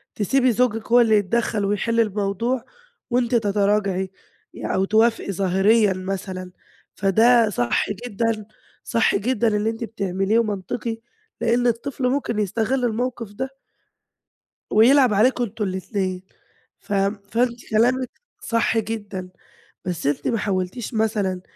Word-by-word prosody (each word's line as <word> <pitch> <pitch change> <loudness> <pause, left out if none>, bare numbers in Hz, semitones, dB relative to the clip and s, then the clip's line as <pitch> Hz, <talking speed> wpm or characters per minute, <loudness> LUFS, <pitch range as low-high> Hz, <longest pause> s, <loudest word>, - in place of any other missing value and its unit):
تسيبي 255 +5 +2
زوجِك 225 -1 0
هو 245 +1 +7
اللي 220 -2 +4
يتدخل 210 +1 0
ويحل 210 +3 0
الموضوع 220 +3 0 0.4
وأنتِ 245 0 +1
تتراجعي 200 -3 +1 0.4
يع - - -3
أو 190 - +2
توافقي 220 0 +2
ظاهريًا 195 +3 +3
مثلًا، 185 -1 -5 0.4
فده 225 +4 +4
صح 120 - 0
جدًا، 225 0 -2 0.4
صح 230 -1 +2
جدًا 230 +2 +1
اللي 210 0 +1
أنتِ 225 +1 -5
بتعمليه 195 0 0
ومنطقي 220 +1 -3 0.4
لإن 240 +1 +2
الطفل 250 +2 -1
ممكن 250 -4 -1
يستغل 225 +5 0
الموقف 240 -1 -2
ده 260 +6 -4 1.2
ويلعب 245 +2 +5
عليكم 245 +4 +3
أنتم 215 -1 -4
الاتنين. 185 -1 -3 0.6
ف 205 - -9 0.4
فأنتِ 240 +1 -1
كلامك 245 +4 +2 0.3
صح 230 0 +1
جدًا. 205 -4 -4 0.6
بس 175 -5 -2
أنتِ 145 0 -1
ما 230 - +1
حولتيش 200 +4 -3
مثلًا، 210 -4 0
220 Hz, 120 wpm, -22 LUFS, 195-235 Hz, 1.2 s, هو